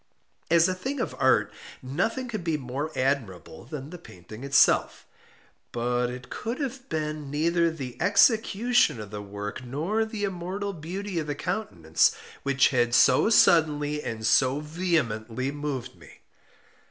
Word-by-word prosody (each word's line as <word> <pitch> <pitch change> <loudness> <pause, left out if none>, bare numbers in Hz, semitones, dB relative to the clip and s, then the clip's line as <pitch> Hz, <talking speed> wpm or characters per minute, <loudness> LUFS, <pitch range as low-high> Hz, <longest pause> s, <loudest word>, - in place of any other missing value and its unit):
As 170 +1 +5
a 185 - 0
thing 265 +10 -4
of - - -2
art - - +3 0.3
nothing 185 - -2
could 215 -6 -5
be 165 -2 0
more 140 +3 -4
admirable 115 - -2
than 145 +2 -7
the 180 - -9
painting 110 - -12
itself. 140 0 +3 0.7
But 120 +1 0
it 125 0 -9
could 230 +3 -4
have 270 -2 -5
been 150 -2 -3
neither 170 +3 +1
the 135 -7 -7
execution 220 - +3
of 105 -1 -8
the 105 -1 -5
work, 105 +4 -6
nor 160 - -1
the 220 -1 -5
immortal 195 +1 -3
beauty 180 +3 -5
of 155 - -4
the 145 - -2
countenance, 85 - 0 0.3
which 140 -1 +3
had 120 -2 +1
so 130 - +5
suddenly 150 -7 +4
and 110 -4 -5
so 130 +5 +3
vehemently 140 -7 -1
moved 140 -4 -4
me. - - -17
150 Hz, 145 wpm, -26 LUFS, 125-185 Hz, 0.7 s, As